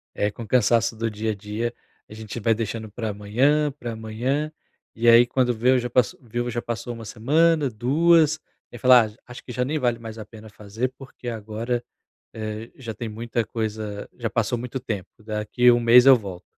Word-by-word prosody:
É, 105 0 0
com 115 - -8
o - - -10
cansaço 115 0 +3
do 115 +1 -2
dia-a-dia, 110 +2 -3 0.4
a - - -11
gente 110 +1 -7
vai 115 +1 +2
deixando 110 0 -4
para 110 0 -4
amanhã, 130 +9 +1
para 120 -4 -7
amanhã, 125 +8 -2 0.4
e 115 +1 0
aí 115 +1 +8
quando 125 0 +1
vê 125 +3 +3
já 120 0 -2
passou 125 -2 +1
viu, 120 +1 -3
já 120 0 -3
passou 120 +1 -5
1 115 -1 -9
semana, 150 +7 +2
2, 155 +7 +3 0.3
e 120 - -9
fala: 125 -2 +6
"J 105 - -14
Acho 125 - -10
que 125 - -9
já 125 +1 -1
nem 150 +4 -1
vale 120 -2 0
mais 115 -1 -8
a 110 - -7
pena 110 0 -13
fazer 105 +5 -4
porque 130 -2 -11
agora, 115 +2 -3 0.5
eh, 110 +1 -6
já 115 -4 -6
tem 115 +2 -5
muita 115 +2 -3
coisa 110 -2 -4
já 120 -2 -3
passou 115 +3 -1
muito 125 +2 -5
tempo, 110 -7 -5 0.2
daqui 110 +3 +2
1 120 - +2
mês 120 +2 +7
eu 135 -2 +9
volto.". 95 -5 -8
115 Hz, 195 wpm, -24 LUFS, 110-125 Hz, 0.5 s, eu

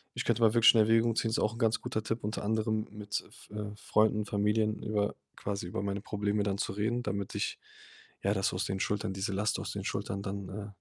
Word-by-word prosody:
ich - - -2
könnte 120 - +1
mal 110 -1 +6
wirklich 115 0 +8
in 110 - +6
Erwägung 115 +1 +4
ziehen 115 - +1
ist 110 - 0
auch 110 - +1
'n 115 - -9
ganz 115 -1 +2
guter 110 - -2
Tipp, 115 +1 -2
unter 105 0 -2
anderem 110 0 0
mit 105 -1 -3
F - - -17
äh, 105 0 -5
Freunden, 105 0 +2
Familien 105 +1 +1
über 105 -1 0 0.2
quasi 100 -3 -3
über 95 - -3
meine 100 0 -2
Probleme 105 0 0
dann 100 -1 0
zu 95 - -2
reden, 115 +4 0
damit 100 -2 -3
ich, - - -2 0.6
ja, 100 - +3
das 95 -2 +1
aus 90 - -1
den 95 -1 -2
Schultern 105 0 -1
diese 95 +1 -2
Last 105 +2 +1
aus - - -4
den - - -4
Schultern 95 +1 -2
dann, 100 -1 -4
äh, 100 +1 -5
105 Hz, 235 wpm, -31 LUFS, 100-110 Hz, 0.6 s, wirklich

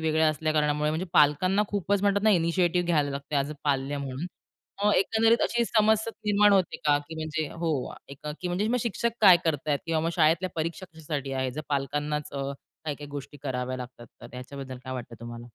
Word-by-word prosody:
वेगळ्या 160 0 +3
असल्या 155 +1 -1
कारणामुळे 150 0 +1
म्हणजे 165 +4 -2
पालकांना 185 +8 +4
खूपच 200 0 0
म्हणतात 200 0 +2
ना 215 - +5
इनिशिएटिव्ह 175 0 +2
घ्यायला 150 -4 +2
लागते 140 +2 -4
ॲज 140 +1 0
अ 150 - -5
पाल्य 140 0 0
म्हणून 140 +4 -4 0.7
एकंदरीत 225 +4 +3
अशी 235 0 +1
समस्या 220 0 +2 0.2
निर्माण 205 0 +5
होते 190 -3 +2
का? 145 -1 +4
की 160 - -7
म्हणजे 155 -1 -3
हो, 165 -1 -3 0.8
म्हणजे 185 +4 0
मग 250 - +2
शिक्षक 235 +1 -1
काय 190 -4 +9
करतायत 150 -2 0
किंवा 165 -1 +1
मग 165 +1 0
शाळेतल्या 165 +3 +3
परीक्षा 165 +4 -3
कशासाठी 145 -4 -4
आहे? 130 -1 -1
जर 150 +5 -5
पालकांनाच 145 +1 -2
अ, 140 0 -3 0.3
काही-काही 145 -1 -4
गोष्टी 145 0 -7
कराव्या 130 -2 -2
लागतात 125 -1 -9
तर 120 - -9
ह्याच्याबद्दल 130 +1 -8
काय 130 - -5
वाटतं 120 -2 -6
तुम्हाला? 120 0 -8
155 Hz, 180 wpm, -27 LUFS, 140-185 Hz, 0.8 s, काय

